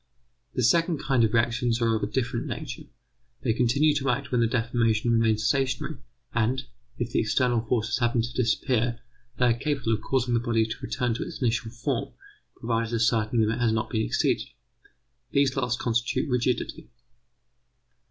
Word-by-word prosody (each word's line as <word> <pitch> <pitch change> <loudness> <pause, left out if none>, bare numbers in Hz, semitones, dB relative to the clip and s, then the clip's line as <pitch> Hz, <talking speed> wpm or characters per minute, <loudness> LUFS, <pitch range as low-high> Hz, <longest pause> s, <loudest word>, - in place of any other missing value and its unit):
The 125 - 0
second 165 +7 +3
kind 135 -4 +1
of 110 - +2
reactions 115 +1 +1
are 115 -1 +2
of 110 - -2
a 100 - 0
different 120 +3 -2
nature. - - -6 0.6
They 115 - +2
continue 125 +6 +3
to 135 -1 -1
act 135 +3 -1
when 125 -2 +2
the 115 - +4
deformation 115 -1 +1
remains 110 -2 +2
stationary, 135 +2 0 0.4
and, 120 +3 +1 0.3
if 120 0 -3
the - - +1
external 120 +1 +2
forces 115 0 0
happen 120 -1 +2
to 120 +1 -5
disappear, 120 0 0 0.4
they 125 - +3
are 120 - +4
capable 125 -2 -1
of 110 - -1
causing 125 +1 0
the 120 - +3
body 115 -2 +1
to 110 +4 -6
return 125 -2 -1
to 115 - -3
its - - -8
initial 115 -2 0
form, 120 +2 -3 0.4
provided 115 0 -1
a - - 0
certain 110 0 +2
limit 110 +2 +1
has 115 -2 +2
not 110 -1 -2
been 110 -3 +1
exceeded. - - 0 0.9
These 140 -1 +3
last 125 -3 0
constitute 120 +5 0
rigidity. 125 -1 -1
120 Hz, 170 wpm, -26 LUFS, 115-125 Hz, 0.9 s, the